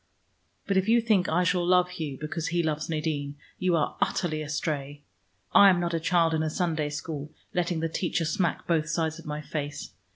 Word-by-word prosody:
But 200 Hz, -1 st, +1 dB
if 190 Hz, +3 st, +1 dB
you 235 Hz, +1 st, +6 dB
think 215 Hz, -6 st, +2 dB
I 180 Hz, +3 st, +2 dB
shall 180 Hz, 0 st, +2 dB
love 180 Hz, 0 st, +4 dB
Hugh, 155 Hz, -7 st, -5 dB
because 155 Hz, +2 st, -3 dB
he 170 Hz, 0 st, 0 dB
loves 155 Hz, 0 st, -2 dB
Nadine, 150 Hz, -3 st, -2 dB, 0.2 s
you 180 Hz, -2 st, +2 dB
are 160 Hz, -, 0 dB
utterly 155 Hz, -4 st, 0 dB
astray. 145 Hz, -1 st, -3 dB, 0.5 s
I 200 Hz, -, +9 dB
am 180 Hz, -2 st, +3 dB
not 170 Hz, -1 st, -1 dB
a 165 Hz, -, +1 dB
child 165 Hz, 0 st, +2 dB
in 160 Hz, -, +1 dB
a 155 Hz, -, 0 dB
Sunday 160 Hz, -3 st, -1 dB
school, 150 Hz, 0 st, -5 dB, 0.2 s
letting 175 Hz, -2 st, 0 dB
the 165 Hz, -, +1 dB
teacher 165 Hz, 0 st, -1 dB
smack 170 Hz, +1 st, 0 dB
both 160 Hz, -2 st, +1 dB
sides 160 Hz, -1 st, -1 dB
of 165 Hz, -, -12 dB
my 150 Hz, 0 st, -3 dB
face. 145 Hz, -1 st, -5 dB
160 Hz, 200 wpm, -27 LUFS, 150-180 Hz, 0.5 s, I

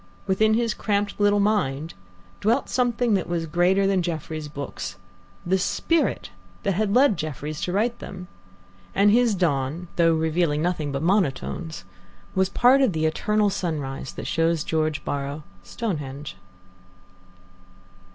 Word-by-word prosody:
Within 215 Hz, +3 st, +3 dB
his 230 Hz, -1 st, +1 dB
cramped 205 Hz, -1 st, -1 dB
little 205 Hz, 0 st, +4 dB
mind 165 Hz, -8 st, 0 dB, 0.5 s
dwelt 235 Hz, +6 st, +1 dB
something 245 Hz, -2 st, +1 dB
that 190 Hz, -3 st, 0 dB
was 170 Hz, -1 st, -1 dB
greater 180 Hz, +5 st, +2 dB
than 195 Hz, -1 st, +2 dB
Jefferies' 160 Hz, -2 st, -4 dB
books 145 Hz, -1 st, -6 dB, 0.5 s
the 190 Hz, +2 st, +2 dB
spirit 330 Hz, -, 0 dB, 0.3 s
that 200 Hz, +1 st, 0 dB
led 250 Hz, -2 st, +4 dB
Jefferies 150 Hz, 0 st, -5 dB
to 180 Hz, -, -1 dB
write 230 Hz, +5 st, 0 dB
them; 180 Hz, 0 st, -8 dB, 0.7 s
and 205 Hz, +1 st, +5 dB
his 235 Hz, -1 st, +4 dB
dawn, 165 Hz, -1 st, -1 dB
though 165 Hz, -1 st, +4 dB
revealing 160 Hz, -1 st, +1 dB
nothing 165 Hz, -5 st, -1 dB
but 135 Hz, +2 st, -3 dB
monotones, 165 Hz, -, -1 dB, 0.5 s
was 190 Hz, -1 st, +2 dB
part 250 Hz, +6 st, +5 dB
of 255 Hz, -8 st, +3 dB
the 160 Hz, 0 st, 0 dB
eternal 210 Hz, +6 st, +1 dB
sunrise 145 Hz, -8 st, -3 dB
that -, -, -7 dB
shows 165 Hz, -1 st, +1 dB
George 155 Hz, -1 st, -1 dB
Borrow 140 Hz, +2 st, -3 dB, 0.2 s
Stonehenge. 145 Hz, -, -5 dB
175 Hz, 130 wpm, -24 LUFS, 155-205 Hz, 0.7 s, and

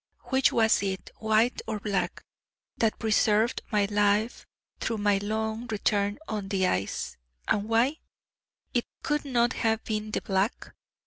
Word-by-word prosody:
Which 265 Hz, 0 st, +4 dB
was 225 Hz, -1 st, +4 dB
it 190 Hz, -1 st, -3 dB
White 220 Hz, +3 st, +2 dB
or 215 Hz, -1 st, -2 dB
Black 195 Hz, -4 st, -2 dB, 0.5 s
that 225 Hz, -2 st, +1 dB
preserved 220 Hz, +1 st, +2 dB
my 210 Hz, -2 st, +3 dB
life 205 Hz, +2 st, +1 dB, 0.3 s
through 225 Hz, -, -1 dB
my 205 Hz, -1 st, +2 dB
long 220 Hz, +3 st, -2 dB
return 205 Hz, -2 st, 0 dB
on 210 Hz, -3 st, -3 dB
the 195 Hz, -2 st, +1 dB
ice 95 Hz, -, -1 dB, 0.3 s
and 210 Hz, +1 st, 0 dB
why? 245 Hz, +7 st, +3 dB, 0.8 s
It 240 Hz, -, 0 dB, 0.2 s
could 295 Hz, 0 st, 0 dB
not 240 Hz, -2 st, +2 dB
have 225 Hz, 0 st, 0 dB
been 215 Hz, -1 st, -3 dB
'the -, -, -2 dB
Black'! 195 Hz, +3 st, -1 dB
215 Hz, 140 wpm, -28 LUFS, 205-225 Hz, 0.8 s, Which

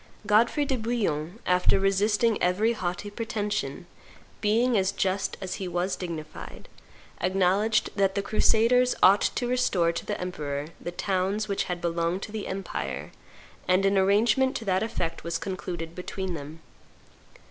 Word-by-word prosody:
Godfrey 230 Hz, +8 st, +3 dB
do 265 Hz, -3 st, -1 dB
Bouillon, 200 Hz, -7 st, -1 dB
after 180 Hz, +1 st, +3 dB
resisting 210 Hz, +3 st, +2 dB
every 200 Hz, +6 st, +2 dB
haughty 185 Hz, 0 st, -4 dB
pretension, 205 Hz, -, -3 dB, 0.6 s
being 230 Hz, +4 st, +2 dB
as 190 Hz, -2 st, +2 dB
just 195 Hz, 0 st, -1 dB
as 185 Hz, -1 st, -4 dB
he 190 Hz, -, -2 dB
was 180 Hz, +2 st, -1 dB
dignified, 160 Hz, -4 st, -7 dB, 0.5 s
acknowledged 195 Hz, +4 st, +2 dB
that 195 Hz, -1 st, +2 dB
the 200 Hz, -, 0 dB
crusaders 235 Hz, +4 st, +3 dB
ought 195 Hz, +2 st, +7 dB
to 245 Hz, -, 0 dB
restore 205 Hz, -9 st, +2 dB
to 170 Hz, -, -4 dB
the 210 Hz, -, -4 dB
emperor 150 Hz, -5 st, -4 dB
the -, -, -4 dB
towns 190 Hz, +3 st, -1 dB
which 200 Hz, -1 st, -1 dB
had 175 Hz, -1 st, -4 dB
belonged 170 Hz, +2 st, -1 dB
to 215 Hz, -, -7 dB
the 215 Hz, -1 st, -4 dB
empire, 195 Hz, +1 st, -4 dB, 0.6 s
and 185 Hz, +2 st, +3 dB
an 195 Hz, 0 st, +3 dB
arrangement 215 Hz, +8 st, +3 dB
to 230 Hz, -, -4 dB
that 190 Hz, -1 st, +1 dB
effect 175 Hz, -7 st, -3 dB
was 170 Hz, 0 st, -2 dB
concluded 175 Hz, -4 st, -5 dB
between 185 Hz, +1 st, -4 dB
them. 155 Hz, +1 st, -8 dB
195 Hz, 145 wpm, -27 LUFS, 175-215 Hz, 0.6 s, ought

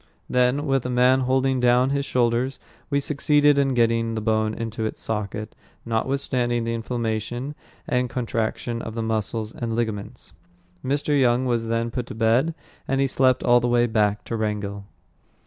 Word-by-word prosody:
Then, 125 Hz, +3 st, +2 dB
with 135 Hz, -3 st, +1 dB
a -, -, -4 dB
man 125 Hz, +1 st, +4 dB
holding 130 Hz, 0 st, +1 dB
down 125 Hz, +2 st, +3 dB
his 140 Hz, 0 st, 0 dB
shoulders, 125 Hz, +2 st, +1 dB, 0.3 s
we 140 Hz, -1 st, +2 dB
succeeded 145 Hz, 0 st, +3 dB
in 135 Hz, -2 st, +1 dB
getting 115 Hz, -1 st, +2 dB
the -, -, -1 dB
bone 110 Hz, 0 st, +1 dB
into 115 Hz, -1 st, -4 dB
its 110 Hz, -, -3 dB
socket, 105 Hz, 0 st, -4 dB, 0.3 s
notwithstanding 120 Hz, 0 st, 0 dB
the 115 Hz, 0 st, -2 dB
inflammation 115 Hz, +3 st, -3 dB, 0.3 s
and 125 Hz, 0 st, 0 dB
contraction 115 Hz, -1 st, -2 dB
of 115 Hz, -, -6 dB
the 115 Hz, -, -2 dB
muscles 110 Hz, 0 st, -2 dB
and 115 Hz, -2 st, -3 dB
ligaments. 110 Hz, -4 st, -4 dB, 0.5 s
Mr. 145 Hz, +1 st, +1 dB
Young 125 Hz, 0 st, +3 dB
was 120 Hz, -2 st, 0 dB
then 115 Hz, +1 st, -1 dB
put 125 Hz, 0 st, -4 dB
to -, -, -7 dB
bed, 115 Hz, +8 st, +2 dB, 0.3 s
and 135 Hz, -, 0 dB
he 135 Hz, -, +3 dB
slept 130 Hz, -1 st, +2 dB
all 120 Hz, 0 st, +5 dB
the 120 Hz, -, -1 dB
way 120 Hz, 0 st, +3 dB
back 105 Hz, -3 st, +1 dB
to 115 Hz, -, -4 dB
Wrangell. 105 Hz, -2 st, -3 dB
120 Hz, 165 wpm, -24 LUFS, 110-130 Hz, 0.5 s, all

